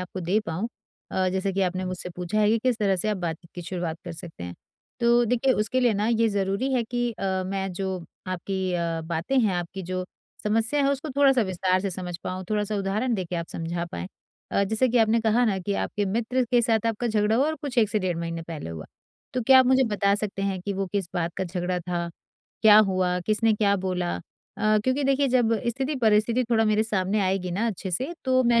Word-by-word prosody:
आपको 180 Hz, +1 st, -6 dB
दे 180 Hz, +5 st, +1 dB
पाऊँ 180 Hz, +8 st, -2 dB, 0.4 s
अ, 185 Hz, 0 st, +1 dB
जैसा 190 Hz, +1 st, -1 dB
कि 195 Hz, -, -1 dB
आपने 185 Hz, 0 st, -1 dB
मुझसे 185 Hz, -1 st, -3 dB
पूछा 180 Hz, +4 st, -2 dB
है 210 Hz, -, +4 dB
कि 225 Hz, -, +3 dB
किस 240 Hz, 0 st, 0 dB
तरह 195 Hz, -3 st, +2 dB
से 215 Hz, -, -1 dB
आप 210 Hz, -, 0 dB
बातचीत 170 Hz, -2 st, -5 dB
की 175 Hz, -, -6 dB
शुरुआत 175 Hz, -2 st, -3 dB
कर 175 Hz, -, -6 dB
सकते 165 Hz, -, -8 dB
हैं। 90 Hz, 0 st, -7 dB, 0.5 s
तो 235 Hz, 0 st, +4 dB
देखिए 250 Hz, +3 st, +2 dB
उसके 220 Hz, +4 st, 0 dB
लिए 245 Hz, -3 st, +4 dB
ना 205 Hz, +2 st, 0 dB
ये 230 Hz, -1 st, +3 dB
ज़रूरी 200 Hz, +6 st, -1 dB
है 250 Hz, -2 st, +2 dB
कि 240 Hz, +1 st, -1 dB
अ, 190 Hz, -3 st, -2 dB
मैं 195 Hz, -1 st, -2 dB
जो 190 Hz, 0 st, -3 dB, 0.3 s
आपकी 185 Hz, 0 st, -2 dB
अ, 170 Hz, -2 st, -1 dB
बातें 170 Hz, +11 st, -1 dB
हैं, 215 Hz, -6 st, +2 dB
आपकी 175 Hz, +2 st, -4 dB
जो 185 Hz, +1 st, -3 dB, 0.4 s
समस्या 225 Hz, +7 st, +2 dB
है 275 Hz, -, +3 dB
उसको 280 Hz, +2 st, -3 dB
थोड़ा-सा 270 Hz, -4 st, +5 dB
विस्तार 185 Hz, -1 st, +1 dB
से 195 Hz, 0 st, -2 dB
समझ 180 Hz, -1 st, -5 dB
पाऊँ, 185 Hz, +1 st, -4 dB
थोड़ा-सा 210 Hz, 0 st, 0 dB
उदाहरण 205 Hz, +5 st, 0 dB
देके 180 Hz, -3 st, -3 dB
आप 170 Hz, 0 st, -3 dB
समझा 170 Hz, +1 st, -3 dB
पाएँ। 85 Hz, +1 st, -4 dB, 0.5 s
अ, -, -, +3 dB
जैसे 220 Hz, +5 st, +1 dB
कि 245 Hz, -, +2 dB
आपने 225 Hz, 0 st, +4 dB
कहा 225 Hz, +2 st, +3 dB
ना 200 Hz, -4 st, +1 dB
कि 200 Hz, +2 st, -2 dB
आपके 205 Hz, -, -2 dB
मित्र 235 Hz, +5 st, 0 dB
के 245 Hz, -1 st, +4 dB
साथ 225 Hz, -1 st, +1 dB
आपका 230 Hz, +2 st, -1 dB
झगड़ा 215 Hz, 0 st, +2 dB
हुआ 275 Hz, -, +3 dB
और 315 Hz, -, 0 dB
कुछ 275 Hz, -4 st, -2 dB
1 215 Hz, -3 st, +4 dB
से 215 Hz, -, +1 dB
डेढ़ 185 Hz, -4 st, -1 dB
महीने 165 Hz, 0 st, -4 dB
पहले 160 Hz, -, -7 dB
हुआ। 80 Hz, -1 st, -7 dB, 0.5 s
तो 250 Hz, -, 0 dB
क्या 260 Hz, +3 st, +7 dB
आप 260 Hz, -, +5 dB
मुझे 260 Hz, +1 st, +4 dB
बता 200 Hz, 0 st, +3 dB
सकते 200 Hz, -1 st, -3 dB
हैं 195 Hz, -2 st, -1 dB
कि 200 Hz, +2 st, -2 dB
वो 195 Hz, 0 st, -2 dB
किस 195 Hz, -4 st, -1 dB
बात 170 Hz, -1 st, -1 dB
का 190 Hz, -, -1 dB
झगड़ा 180 Hz, 0 st, -2 dB
था, 170 Hz, 0 st, -3 dB, 0.5 s
क्या 215 Hz, -1 st, +9 dB
हुआ, 180 Hz, -1 st, +1 dB
किसने 220 Hz, +1 st, +3 dB
क्या 205 Hz, -1 st, +2 dB
बोला? 180 Hz, -1 st, -1 dB, 0.4 s
अ, 215 Hz, 0 st, +3 dB
क्योंकि 260 Hz, +2 st, +1 dB
देखिए 275 Hz, +1 st, +2 dB
जब 245 Hz, -3 st, +3 dB, 0.2 s
स्थिति-परिस्थिति 240 Hz, -2 st, +2 dB
थोड़ा 225 Hz, -1 st, +4 dB
मेरे 215 Hz, 0 st, +3 dB
सामने 205 Hz, -1 st, 0 dB
आएगी 190 Hz, -1 st, 0 dB
ना 205 Hz, +7 st, 0 dB
अच्छे 195 Hz, -3 st, -3 dB
से 260 Hz, -, -2 dB
तो 255 Hz, -1 st, +3 dB
मैं 235 Hz, 0 st, +4 dB
200 Hz, 225 wpm, -25 LUFS, 185-230 Hz, 0.5 s, क्या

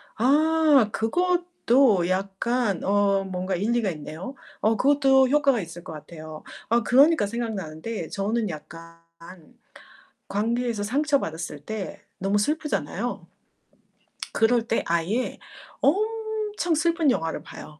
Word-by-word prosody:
아. 280 Hz, +7 st, +3 dB, 0.4 s
그것도 275 Hz, -, +2 dB
약간 195 Hz, +3 st, -1 dB
어 200 Hz, 0 st, +2 dB
뭔가 185 Hz, 0 st, -3 dB
일리가 220 Hz, +2 st, 0 dB
있네요. 160 Hz, -, -7 dB, 0.3 s
어 220 Hz, +1 st, +3 dB
그것도 270 Hz, -1 st, +4 dB
효과가 280 Hz, -4 st, +3 dB
있을 170 Hz, 0 st, -9 dB
것 -, -, -8 dB
같아요. 155 Hz, 0 st, -10 dB, 0.3 s
아 235 Hz, +1 st, +3 dB
그러니까 275 Hz, -3 st, +5 dB
생각나는데 205 Hz, -4 st, -4 dB
저는 210 Hz, +1 st, -1 dB
약간 165 Hz, +1 st, -10 dB, 1.3 s
관계에서 230 Hz, +2 st, -1 dB
상처받았을 205 Hz, -, -1 dB
때 215 Hz, 0 st, -5 dB, 0.2 s
너무 195 Hz, +2 st, +1 dB
슬프잖아요. 300 Hz, +7 st, -2 dB, 1.1 s
그럴 230 Hz, 0 st, +2 dB
때 225 Hz, -, 0 dB
아예 170 Hz, +9 st, -1 dB, 0.4 s
엄청 430 Hz, 0 st, 0 dB
슬픈 330 Hz, -2 st, +2 dB
영화를 165 Hz, -9 st, -2 dB
봐요. 150 Hz, 0 st, -11 dB
225 Hz, 245 characters per minute, -25 LUFS, 185-275 Hz, 1.3 s, 그러니까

